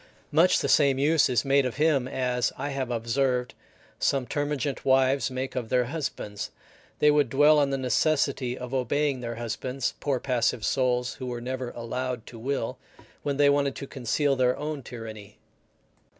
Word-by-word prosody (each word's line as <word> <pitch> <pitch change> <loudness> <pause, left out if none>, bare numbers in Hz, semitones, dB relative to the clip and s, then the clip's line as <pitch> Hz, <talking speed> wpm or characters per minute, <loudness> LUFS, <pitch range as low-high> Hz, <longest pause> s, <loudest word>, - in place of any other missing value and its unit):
Much 165 +5 +5
the - - 0
same 140 -3 +4
use 150 +1 +3
is 125 +2 +1
made 140 0 +4
of 125 -2 -3
him 145 -4 +2
as, 125 -2 0
I 140 +2 -3
have 135 -2 -3
observed, 125 +2 0 0.5
some 135 -2 +1
termagant 145 0 -2
wives 130 -2 +3
make 130 +1 -4
of 120 -3 -3
their 125 -1 +2
husbands; 120 -7 -4 0.5
they 150 - +5
would 145 -4 +3
dwell 150 +3 +5
on 140 -1 +2
the 135 - -1
necessity 130 -1 +1
of 125 +1 -7
obeying 135 +2 0
their 120 -1 -5
husbands, 125 +3 -3
poor 140 -3 0
passive 120 -4 0
souls, 125 -1 +1
who 125 -2 -5
never 130 +1 -4
were - - -6
allowed 125 0 -4
to 115 - -11
will, 130 -1 -3 0.4
when 140 -1 -2
they 145 0 +5
wanted 140 -1 +2
to 140 - -6
conceal 135 +2 0
their 125 -1 +2
own 150 0 -4
tyranny. 110 -4 -9
130 Hz, 170 wpm, -27 LUFS, 125-140 Hz, 0.5 s, Much